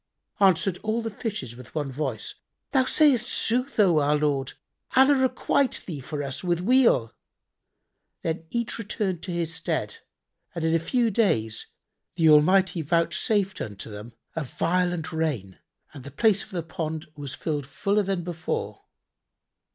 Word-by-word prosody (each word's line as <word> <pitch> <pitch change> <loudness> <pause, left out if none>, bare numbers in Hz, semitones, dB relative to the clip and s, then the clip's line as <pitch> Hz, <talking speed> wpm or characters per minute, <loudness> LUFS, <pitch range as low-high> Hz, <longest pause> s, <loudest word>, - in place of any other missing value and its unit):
"[FN#77] 200 - +7
Answered 185 0 +1
all 220 +2 -1
the 225 - -2
fishes 200 - -4
with 125 +2 -13
one 145 -3 -2
voice 130 -6 -3 0.4
"Thou 260 -2 +3
sayst 280 -5 +3
sooth, 250 +3 0
O 180 -7 +5
our 145 +1 +2
lord: 140 -3 0 0.4
Allah 265 +2 +7
requite 265 0 +1
thee 160 -6 -5
for 145 +2 -5
us 140 +3 -5
with 175 -2 +1
weal!" 230 - +3 1.1
Then 160 0 -2
each 235 +1 -2
returned 200 -5 -2
to 185 - -5
his 170 -1 -2
stead, 165 - -2 0.6
and 170 - -3
in 160 - +2
a 165 - +4
few 235 +7 +1
days 110 - +1 0.5
the 165 -3 +4
Almighty 180 +4 +4
vouchsafed 175 - +1
unto 105 +1 -6
them 105 +3 -9 0.2
a 165 - -1
violent 175 +4 -1
rain 140 - -2 0.3
and 135 - -10
the 140 - -8
place 215 +3 +2
of - - -15
the 180 -5 -3
pond 160 -2 -4
was 145 -2 -6
filled 145 -4 -3
fuller 200 +7 +1
than 190 -3 -2
before. 170 -2 -4
170 Hz, 155 wpm, -26 LUFS, 150-205 Hz, 1.1 s, FN#77